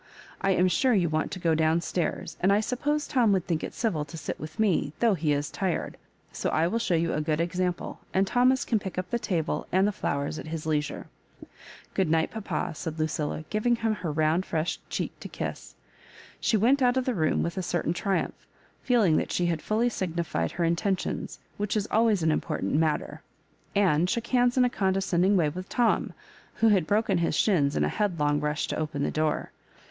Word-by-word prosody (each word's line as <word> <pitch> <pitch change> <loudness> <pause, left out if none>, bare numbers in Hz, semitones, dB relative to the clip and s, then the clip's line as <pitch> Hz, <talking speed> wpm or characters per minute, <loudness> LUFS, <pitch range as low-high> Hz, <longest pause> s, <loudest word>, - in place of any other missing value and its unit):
I 195 - +1
am 180 - +4
sure 250 +6 +3
you 175 -4 +2
want 155 0 0
to - - -5
go 165 -2 +2
down 160 +1 +2
stairs, 175 -1 -2
and 190 - +4
I 200 - +4
suppose 285 +6 -1
Tom 245 -7 +2
would 185 -3 0
think 165 -3 -1
it - - -5
civil 195 -11 0
to 145 +3 -9
sit - - -5
with 155 +1 -8
me, 185 -8 +2
though 230 -3 +4
he 155 -4 0
is 145 +1 -1
tired; 190 -3 -2 0.4
so - - -2
I 160 - +2
will 225 +7 0
show 210 -6 +1
you 165 0 +1
a 150 - 0
good 150 0 0
example, 180 +1 -2
and 190 +1 +2
Thomas 250 +5 +3
can 225 - +1
pick 190 -2 -7
up 185 0 -3
the 235 - 0
table 170 -8 -2
and 190 +2 +3
the - - +1
flowers 145 -4 -2
at - - -8
his 160 -1 -5
leisure. 150 -2 -1 0.9
Grood 190 - +1
night, 160 0 +2
papa," 195 -8 -3
said 160 0 -5
LuciUa, 155 -1 -2
giving 230 +3 +2
him 225 -1 0
her 180 -6 -4
round 155 +4 +2
fresh 165 -2 -2
cheek - - -2
to - - -7
kiss. - - -6 0.6
She 220 - +2
went 255 +7 +3
out 250 0 +3
of 260 - +1
the 255 - 0
room 160 -7 +1
with 170 - -3
a 190 - -2
certain 175 -2 -1
triumph, 195 +2 -2 0.4
feeUng 220 -11 +3
that - - -1
she 175 - +1
had 165 -3 0
fully 225 +3 +1
signified 170 - -2
her 175 - -1
intentions, 175 +3 -1 0.2
which 205 +1 -1
is 210 0 -1
always 220 -5 +3
an 160 - +3
im - - +1
portant - - -3
matter; 155 0 0 0.5
and 180 -4 +3
shook 235 +2 -1
hands 245 0 +2
in 250 - +5
a - - +4
con 190 -4 +1
descending 190 0 +2
way 160 -4 +3
with 185 +5 -7
Tom, 240 -2 +1 0.4
who 225 - +4
had 190 -6 +3
broken 205 -3 +2
his 165 -2 0
shins 150 -9 +2
in 75 - +2
a - - +2
headlong 150 - 0
rush 150 0 -1
to - - -3
open 150 -2 -2
the - - 0
door. 155 0 -1
180 Hz, 215 wpm, -27 LUFS, 155-215 Hz, 0.9 s, in